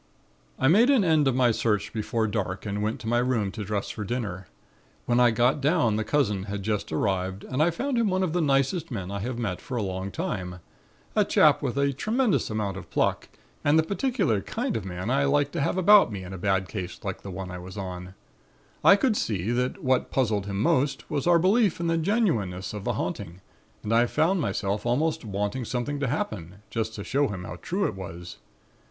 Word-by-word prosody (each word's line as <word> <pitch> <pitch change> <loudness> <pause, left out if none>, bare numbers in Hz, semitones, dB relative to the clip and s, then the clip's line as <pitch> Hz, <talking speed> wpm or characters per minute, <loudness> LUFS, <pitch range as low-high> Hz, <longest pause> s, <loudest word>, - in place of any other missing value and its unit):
"I 130 - +2
made 215 - +5
an 265 -7 +5
end 155 -5 +3
of 130 - +2
my 125 -2 +4
search 110 -2 0
before 110 +1 -1
dark 100 -3 -3
and 105 0 -2
went 110 +5 -1
to 110 - -7
my 120 +1 +2
room 120 -5 0
to 105 0 -5
dress 100 0 -3
for 105 - -5
dinner. 100 -6 -4 0.6
When 120 0 +2
I 120 -1 +6
got 120 +5 +2
down 145 -7 +2
the 110 - 0
cousin 105 -6 0
had 100 -1 -5
just 105 0 -2
arrived 95 +3 -1
and 130 +3 -2
I 165 - +4
found 250 +9 -1
him 230 - +2
one 185 0 +1
of 170 -4 -1
the 175 - +1
nicest 140 +3 +1
men 100 -7 -5
I 100 - -3
have 120 +4 -4
met 100 -7 -3
for 125 - -5
a 110 - 0
long 95 0 -3
time. 95 - -4 0.6
A - - +5
chap - - +4
with 125 - -2
a 140 0 +2
tremendous 220 - +1
amount 105 -3 -2
of 95 - -9
pluck, - - 0 0.3
and 145 +2 +4
the 160 - +4
particular 200 - 0
kind 240 - -3
of 100 - -3
man 90 +4 -4
I 140 +1 +2
like 145 0 +2
to - - -2
have 140 - 0
with 200 +2 +7
me 100 -3 -6
in 90 +1 -8
a - - -5
bad 95 0 +1
case 90 -4 -6
like - - -4
the 100 - -8
one 95 -1 -6
I 90 - -6
was 95 +3 -10
on. 90 -1 -6 0.7
I 195 - +8
could 220 +2 +1
see 105 - -1
that 125 +8 -1
what 130 -1 +1
puzzled 105 -6 0
him 100 -1 -3
most 130 +5 +1
was 145 +1 -1
our 175 -1 +6
belief 195 +3 +3
in 170 - -2
the 165 0 +1
genuineness 155 - 0
of 105 -1 -6
the - - 0
haunting 85 +3 -4 0.4
and 110 - -1
I 120 +1 +4
found 165 +7 +1
myself 100 -6 -1
almost 155 +6 0
wanting 105 +4 -2
something 125 +5 -3
to 140 - 0
happen, 110 - -3 0.2
just 110 -1 -2
to 100 - -6
show 140 +6 +1
him 100 -4 -5
how 90 0 -7
true 195 - -2
it - - -1
was. 90 -2 -8
120 Hz, 220 wpm, -26 LUFS, 100-155 Hz, 0.7 s, I